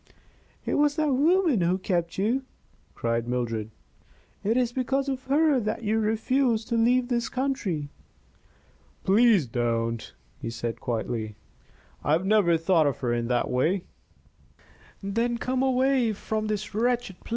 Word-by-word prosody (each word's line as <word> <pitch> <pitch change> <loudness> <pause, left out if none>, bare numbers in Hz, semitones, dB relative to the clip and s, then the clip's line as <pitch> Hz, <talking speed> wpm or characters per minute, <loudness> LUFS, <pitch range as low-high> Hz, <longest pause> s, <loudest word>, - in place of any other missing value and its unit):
"It - - 0
was 290 0 +3
that 305 -3 +1
woman 315 - +3
who 175 +2 +2
kept 175 -3 -2
you!" 230 +7 +1 0.5
cried 115 0 -1
Mildred. 115 -3 -2 0.7
"It 225 +4 +1
is 245 -2 +1
because 270 +2 0
of 265 -1 -3
her 290 0 +3
that 215 +1 -3
you 220 +1 +1
refuse 225 +2 +1
to 235 - -2
leave 245 +2 +3
this 240 -2 -1
country!" 220 - -2 1.1
"Please 210 - +4
don't," 115 -1 -2 0.3
he 115 - -4
said, 115 0 -4
quietly. 115 -3 -3 0.7
"I 145 - +2
have 170 +4 +1
never 195 -5 +4
thought 165 -2 +3
of 140 - -1
her 120 -2 0
in 120 0 -1
that 125 0 +1
way 170 +9 +1 0.6
" - - -28
"Then 230 +4 0
come 255 +2 -1
away 260 -3 +2
from 215 +1 -3
this 210 -1 -3
wretched 235 -3 -1
place. - - -15
215 Hz, 150 wpm, -26 LUFS, -, 1.1 s, Please